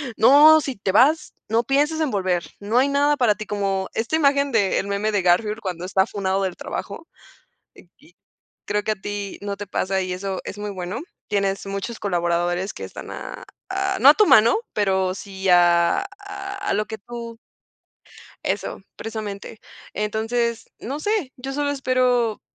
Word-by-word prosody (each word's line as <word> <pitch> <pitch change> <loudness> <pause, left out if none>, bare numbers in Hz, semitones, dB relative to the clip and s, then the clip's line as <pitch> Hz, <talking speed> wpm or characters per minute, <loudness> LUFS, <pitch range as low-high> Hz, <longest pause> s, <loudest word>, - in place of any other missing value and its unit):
"No, 300 +6 +7
si 275 -3 -4
te 195 -2 -2
vas, 285 +10 +3 0.2
no 225 +2 +2
piensas 295 +5 +1
en 305 -4 0
volver, 185 -3 0 0.2
no 210 +4 -1
hay 260 +2 +5
nada 285 +1 +3
para 245 -5 +4
ti", 215 0 -8
como 195 -2 -1
esta 230 +7 -1
imagen, 280 -2 +3
del 205 -5 +1
meme 200 +2 -1
de 205 -2 +1
Garfield, 210 +5 +2
cuando 180 -3 -4
está 190 +1 +2
funado 195 -1 -1
del 185 -2 -2
trabajo. 320 +12 -6 0.7
Aquí - - -21 0.5
creo 210 0 -1
que 215 - +1
a - - -1
ti 205 -1 -5
no 200 -1 -3
te 205 +1 -7
pasa, 190 0 -1
y 185 0 -3
eso 190 +1 -4
es 205 - -7
muy 210 0 -4
bueno. 185 +2 -5 0.3
Tienes 195 -1 -1
muchos 200 +4 -4
colaboradores, 175 0 0
que - - -7
están - - -9
a - - -7 0.3
a 385 0 -1
no 270 - +8
a - - +6
tu 425 - +5
mano, 230 - +6 0.2
pero, 190 -3 +1
sí 190 0 -6
a 175 - +5
a 400 0 -6
lo 210 - 0
que 220 - -6
tú 230 +2 -8 1.1
eso, - - -3
precisamente. 215 -1 -6 0.3
Entonces, 225 +2 -1
no 275 +6 -5
sé, 385 -6 -1
yo 270 +2 -5
solo 290 0 0
espero 255 -4 +1
215 Hz, 170 wpm, -22 LUFS, 195-270 Hz, 1.1 s, no